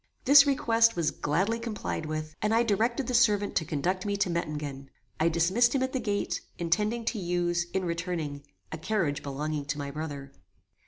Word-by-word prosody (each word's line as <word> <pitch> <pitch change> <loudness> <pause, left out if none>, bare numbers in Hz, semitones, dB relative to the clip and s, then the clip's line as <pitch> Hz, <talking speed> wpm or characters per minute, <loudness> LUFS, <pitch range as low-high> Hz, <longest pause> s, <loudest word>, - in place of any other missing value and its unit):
This 280 +1 +8
request 230 -4 +3
was 170 -3 +1
gladly 190 +10 0
complied 220 -8 -4
with, 155 0 -4
and 215 +1 +2
I 230 - +4
directed 235 +4 0
the 250 - -3
servant 210 -4 +3
to 160 - 0
conduct 180 +6 -1
me 205 -1 -1
to 195 -3 0
Mettingen. 150 -5 -4 0.3
I 160 +2 +3
dismissed 190 - +2
him 260 - +2
at 260 - -2
the 260 - 0
gate, 205 -3 -2 0.2
intending 210 +7 0
to 225 -1 -1
use, 175 -1 0
in 190 -1 -1
returning, 170 -4 -3 0.3
a 160 - -5
carriage 165 -5 -1
belonging 145 +1 -3
to 145 +1 -3
my 140 -1 -4
brother. 145 -2 -6
175 Hz, 180 wpm, -28 LUFS, 155-225 Hz, 0.3 s, This